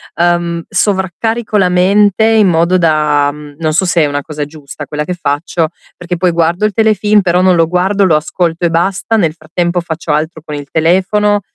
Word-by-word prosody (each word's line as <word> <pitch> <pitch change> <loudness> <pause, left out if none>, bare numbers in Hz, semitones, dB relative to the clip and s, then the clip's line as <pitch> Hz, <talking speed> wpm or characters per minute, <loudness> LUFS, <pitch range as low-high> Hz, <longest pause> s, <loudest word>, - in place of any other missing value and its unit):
uhm, 170 -1 0
sovraccarico 205 +3 -1
la 185 -2 +3
mente 200 +4 +3
in 220 -3 +4
modo 170 +2 +2
da 150 -3 +2
mhmm, 150 -1 -12
non 155 -1 -1
so 185 +4 +2
se 175 -2 +2
è - - +3
una 145 0 -3
cosa 150 -1 -5
giusta 145 -1 -10
quella 150 0 -4
che 180 - -3
faccio, 160 0 -1 0.3
perché 175 0 -5
poi 180 0 +1
guardo 170 +4 0
il 215 - 0
telefilm, 215 -1 +2
però 180 -1 +1
non 185 -1 +4
lo 165 -1 +2
guardo, 190 +3 +1
lo 160 -4 +3
ascolto 170 +2 -1
e - - +2
basta, 195 +6 0
nel 165 -6 +1
frattempo 175 +2 -2
faccio 165 -2 -5
altro 155 +1 -2
con 150 -3 -6
il 145 -1 -7
telefono, 195 +5 +1
175 Hz, 195 wpm, -13 LUFS, 155-190 Hz, 0.3 s, in